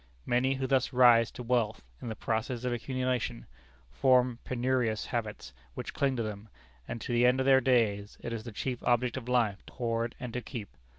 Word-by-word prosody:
Many 130 +2 +2
who 135 0 -2
thus 130 0 +1
rise 120 -3 +6
to 125 - -8
wealth, 115 -3 0 0.2
in - - -5
the 110 - -4
process 115 +3 -2
of 125 -1 0
accumulation, 125 - -2 0.5
form 125 - +3
penurious 125 -3 0
habits 105 - -4 0.2
which - - -6
cling 135 -2 +1
to 115 - -1
them, 105 0 -6 0.4
and 115 - -5
to 120 - -3
the 120 +1 +5
end 125 +1 +3
of 130 - +1
their 135 -1 +6
days 110 -5 +1
it - - -4
is 110 -2 -4
the 120 - -7
chief 125 +3 -3
object 120 0 +1
of 125 -2 -6
life 115 -5 +1
to - - -13
hoard 115 -1 -2
and 125 -3 -6
to 125 - -2
keep. 115 -5 -7
120 Hz, 200 wpm, -30 LUFS, 115-130 Hz, 0.5 s, rise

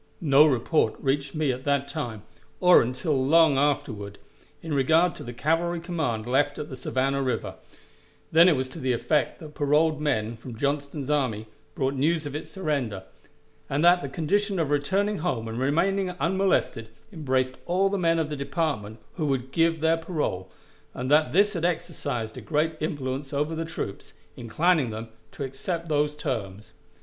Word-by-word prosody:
No 150 -1 +6
report 140 +3 +1
reached 140 +2 -1
me 155 -3 +1
at 130 +1 -5
that 140 -1 +1
time, 120 -8 -5 0.4
or 180 -1 +7
until 130 +3 -1
long 155 0 +5
afterward, 110 -8 -1 0.5
in 160 -2 -4
regard 160 +6 +3
to - - -9
the 120 - -6
cavalry 165 +7 0
command 160 -11 -2
left 145 +4 +1
at 150 - -5
the 130 - -6
Savannah 135 +2 -1
River; 130 -2 -2 0.8
then 170 +3 +7
it 165 - +3
was 130 -1 -2
to - - -9
the 130 -1 0
effect 145 +4 0
that 155 -2 -10
paroled 150 +2 +2
men 115 -6 0
from 115 0 -9
Johnston's 140 +1 -2
army 125 -7 0 0.3
brought 135 -4 0
news 155 +4 +1
of 145 - -5
its 150 - -6
surrender, 140 - -2 0.7
and 145 +4 +1
that 175 +1 +6
the 140 - -5
condition 200 +7 0
of 160 -4 0
returning 195 +8 +1
home 130 -9 -2
and 115 +2 -4
remaining 185 +8 +1
unmolested 185 - +1 0.2
embraced 130 -5 0
all 185 +3 +2
the 200 +1 -1
men 165 -1 +2
of 160 -2 -1
the 150 - -3
department 140 - -2 0.2
who 155 -3 -1
would 135 -1 -1
give 165 +1 +2
their 160 +1 +3
parole, 150 - -3 0.5
and 130 +2 -3
that 155 +1 +4
this 205 +3 +3
had 170 -3 -3
exercised 140 -9 -2
a - - -6
great 160 +1 0
influence 135 -3 -3
over 150 +3 0
the 165 0 -3
troops, 160 -11 -6 0.2
inclining 150 +4 +1
them 110 +1 -6 0.2
to - - -6
accept 165 +6 -4
those 150 0 +1
terms. 110 -9 -4
145 Hz, 175 wpm, -26 LUFS, 130-165 Hz, 0.8 s, or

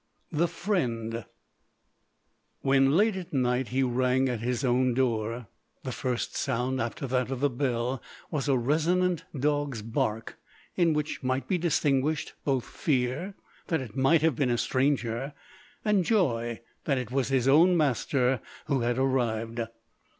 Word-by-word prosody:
THE 170 +2 +2
FRIEND 120 - -2 1.4
When 135 0 +4
late 215 +1 +3
at 185 -3 -6
night 125 -1 +1
he 130 +2 +1
rang 130 +1 +2
at 120 -3 -2
his 120 +3 -2
own 125 0 +2
door, 115 -2 0 0.4
the - - -3
first 125 -2 -2
sound 130 0 -1
after 135 +6 -3
that 125 -1 0
of 135 -2 -3
the 145 0 +2
bell 125 -1 -1 0.3
was 150 -3 -1
a 135 - +4
resonant 165 +7 +1
dog"s 145 -5 0
bark, 110 0 -2 0.4
in 170 -3 +3
which 150 0 -2
might 130 0 -1
be 185 -3 +1
distinguished 150 -2 +1
both 135 -4 0
fear 135 +8 -1 0.3
that 165 - +1
it 115 -5 -8
might 140 +4 +4
have 160 -5 +3
been 130 +1 +1
a 120 - +1
stranger, 130 +1 0 0.5
and 210 -3 +3
joy 120 - +1 0.2
that 140 -3 +1
it 125 -2 -4
was 135 0 +1
his 130 -2 +1
own 170 +6 +6
master, 130 -3 +1 0.2
who 140 -3 +1
had 120 0 0
arrived. 120 -3 0
130 Hz, 150 wpm, -28 LUFS, 120-150 Hz, 1.4 s, own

